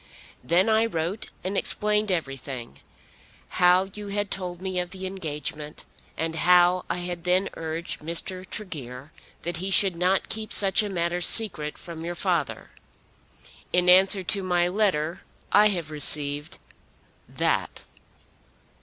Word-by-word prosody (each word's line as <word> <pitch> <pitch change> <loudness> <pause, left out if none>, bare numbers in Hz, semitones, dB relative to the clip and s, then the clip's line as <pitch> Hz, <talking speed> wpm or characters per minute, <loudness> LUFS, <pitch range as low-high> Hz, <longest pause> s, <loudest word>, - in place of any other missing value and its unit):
Then 175 - +3
I 220 +1 +3
wrote 170 +1 -4
and 190 +2 -3
explained 210 0 +1
everything, 135 -7 -5 0.7
how 180 +2 +3
you 210 -1 -7
had 205 0 -2
told 180 -2 -4
me 185 -1 -3
of 180 0 -3
the 190 0 -8
engagement, 150 -5 -6 0.3
and 160 0 -2
how 180 +1 +4
I - - -2
had 175 -1 -5
then 185 +2 +2
urged 165 +2 -5
Mr. 170 +4 -1
Tregear 145 - -7 0.3
that 175 +1 -3
he 190 +2 -3
should 195 -2 +3
not 180 +3 +1
keep 220 -1 -3
such 195 +1 +3
a 210 - -4
matter 175 -1 -2
secret 165 -6 +3
from 165 -2 -9
your 175 +1 -5
father. 175 -6 -2 1.0
In 180 0 +4
answer 190 +1 +6
to 195 +2 +1
my 175 -2 +1
letter 180 -5 0 0.3
I 210 +1 +6
have 170 -7 -3
received 145 0 +2 0.7
that." - - -2
180 Hz, 135 wpm, -25 LUFS, 160-195 Hz, 1.0 s, answer